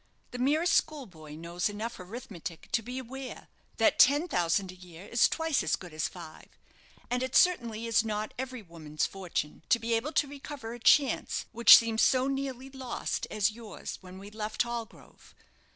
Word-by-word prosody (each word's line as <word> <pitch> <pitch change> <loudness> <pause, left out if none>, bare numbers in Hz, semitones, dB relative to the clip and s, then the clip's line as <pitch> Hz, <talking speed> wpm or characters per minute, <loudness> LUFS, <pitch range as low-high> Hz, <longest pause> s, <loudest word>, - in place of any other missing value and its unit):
The 245 - -6
merest 310 +7 +2
schoolboy 185 - -2
knows 170 +5 -2
enough 215 +3 -5
arithmetic 185 -4 -8
to 230 - +2
be 250 +3 -7
aware 260 +1 -8 0.3
that - - +3
ten 290 +5 +6
thousand 180 - 0
a - - -14
year 180 0 -13
is 235 - +3
twice 320 -3 0
as - - +1
good 175 -4 -11
as 155 - -1
five. 165 -3 -11 0.6
And 245 0 0
it 260 0 -3
certainly 235 -11 +3
is 230 -1 +3
not 215 -1 -3
every 255 -2 -6
woman's 155 -4 -4
fortune 180 -6 -4
to 235 - +5
be 230 0 -2
able 245 +8 -1
to 290 - +2
recover 275 -4 -8
a 240 - -9
chance 270 +2 +3
which 235 +1 +9
seemed 225 -1 0
so 255 -1 +4
nearly 270 -1 -4
lost 260 -2 -4
as 215 0 +1
yours 220 -2 -8
when 185 0 -11
we 200 +2 -10
left 215 +1 -2
Hallgrove. 235 -1 -8
230 Hz, 175 wpm, -29 LUFS, 185-260 Hz, 0.6 s, which